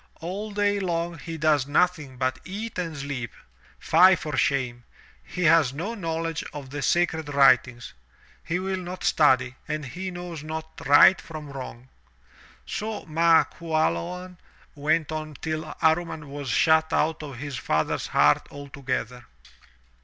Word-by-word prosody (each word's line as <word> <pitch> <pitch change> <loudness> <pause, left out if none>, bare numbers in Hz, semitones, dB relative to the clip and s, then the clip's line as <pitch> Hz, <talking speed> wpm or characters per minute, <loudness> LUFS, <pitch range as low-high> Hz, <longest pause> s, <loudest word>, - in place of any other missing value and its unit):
All 190 +6 -5
day 205 0 +1
long 170 -3 -2
he 165 +1 -6
does 150 -3 +2
nothing 150 -4 +1
but 130 0 -1
eat 205 +2 -6
and 165 -4 -4
sleep. 135 -4 -4 0.5
Fie 185 +3 +6
for 155 -4 -5
shame! 125 -3 0 0.4
He 180 - -5
has 155 -5 +5
no 175 +11 -4
knowledge 165 -5 -3
of 140 -3 -8
the 145 0 -4
sacred 160 -2 +1
writings. 130 -3 +3 0.5
He 170 - -1
will 190 0 -2
not 180 0 -7
study 130 -4 +3
and 155 -1 -3
he 185 +8 -5
knows 175 -3 -7
not 160 +1 -7
right 145 +6 +7
from 155 -3 -9
wrong!" 130 -1 -8 0.8
So 215 0 -4
Ma 165 0 +4
Qualoan 165 - -2 0.3
went 155 +2 0
on 155 -1 -5
till 155 +2 -4
Amman 160 -2 +1
was 140 -1 -6
shut 160 - +3
out 160 0 +1
of 140 -5 -8
his 140 0 -5
father's 80 -7 -1
heart 75 +1 +3
altogether. 130 -4 -5
155 Hz, 140 wpm, -25 LUFS, 140-175 Hz, 0.8 s, right